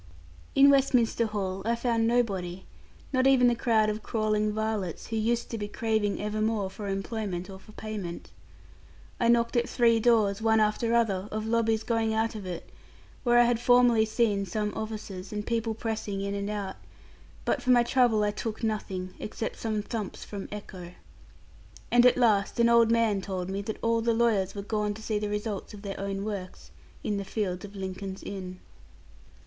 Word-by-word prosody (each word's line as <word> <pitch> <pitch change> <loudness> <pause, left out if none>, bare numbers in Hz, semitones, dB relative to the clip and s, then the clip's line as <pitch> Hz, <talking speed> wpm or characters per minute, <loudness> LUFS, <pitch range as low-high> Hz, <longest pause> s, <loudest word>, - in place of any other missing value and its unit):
In 280 +1 +8
Westminster 250 -4 +3
Hall 195 -3 -3
I 230 +2 +1
found 230 -1 +1
nobody; 190 -7 0 0.5
not 255 0 +3
even 260 -2 +5
the 240 - +4
crowd 230 -2 +2
of 215 +1 -2
crawling 215 -1 0
varlets, 215 -5 -2
who 225 - -3
used 230 +2 0
to 230 - -3
be 205 - -3
craving 220 -1 -1
evermore 210 -1 -1
for 205 0 -7
employment 195 -2 -3
or 190 - -9
for 215 - -16
payment. 210 -6 -6 0.9
I 235 - +2
knocked 235 0 +3
at 240 0 +1
three 230 -2 +3
doors, 220 -3 +3
one 220 0 +3
after 215 +2 +1
other, 205 -5 +1
of 215 0 -3
lobbies 225 -1 +1
going 225 -1 0
out 225 +1 +1
of 205 -4 -7
it, 175 -2 -7 0.5
where 240 -2 +4
I 240 - +8
had 240 -1 +2
formerly 245 -2 +5
seen 215 -2 +1
some 210 +3 -2
officers 215 -4 -6
and 210 -1 -4
people 230 -1 -1
pressing 215 -3 -3
in 200 0 -2
and 200 0 -3
out, 200 -2 -4 0.7
but - - 0
for 255 - -4
my 245 -1 +6
trouble 240 -3 +3
I 205 - +1
took 220 +2 -5
nothing, 190 -4 -3
except 220 +1 -5
some 215 -2 -2
thumps 215 -3 -5
from 200 -2 -7
echo. 185 -4 -8 1.0
And 240 +1 +7
at 250 - +4
last 215 -4 +2
an 235 0 +5
old 235 -1 +5
man 230 -4 +2
told 185 -1 -4
me 195 +1 -2
that 215 +2 -5
all 230 0 +2
the 230 0 +1
lawyers 215 -5 +2
were 200 - -4
gone 210 0 -1
to 220 - -10
see 215 -1 -1
the 210 0 -2
result 210 0 -4
of 200 - -12
their 200 -1 -5
own 195 0 -3
works, 195 -4 -6 0.3
in 205 - -1
the 200 - -2
fields 195 -2 -3
of 205 0 -12
Lincoln's 190 0 -6
Inn. 185 -2 -6
215 Hz, 185 wpm, -28 LUFS, 200-230 Hz, 1.0 s, In